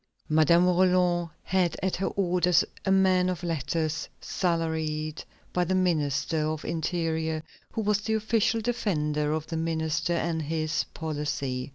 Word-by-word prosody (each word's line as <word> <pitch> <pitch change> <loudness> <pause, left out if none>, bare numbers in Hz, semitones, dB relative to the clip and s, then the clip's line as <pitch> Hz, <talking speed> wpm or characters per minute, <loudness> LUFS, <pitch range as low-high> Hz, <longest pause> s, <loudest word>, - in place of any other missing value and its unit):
Madame 160 +3 +5
Roland 180 -1 +3
had 185 -2 +1
at 190 - 0
her 190 - -1
orders 180 -2 +2 0.2
a 190 - +2
man 185 -1 +4
of 180 -1 -3
letters, 165 0 -2
salaried 160 -3 -1 0.3
by 180 - +2
the 185 +2 0
Ministry 155 -4 +1
of 155 0 -1
the - - -4
Interior, 160 -1 -1 0.3
who 225 - -1
was 210 -1 +1
the 220 +1 0
official 220 +1 +1
defender 150 -11 0
of 155 0 -1
the 165 - -4
minister 160 +1 0
and 165 -1 -1
his 155 0 -1
policy. 145 -5 -3
165 Hz, 145 wpm, -27 LUFS, 155-185 Hz, 0.3 s, Madame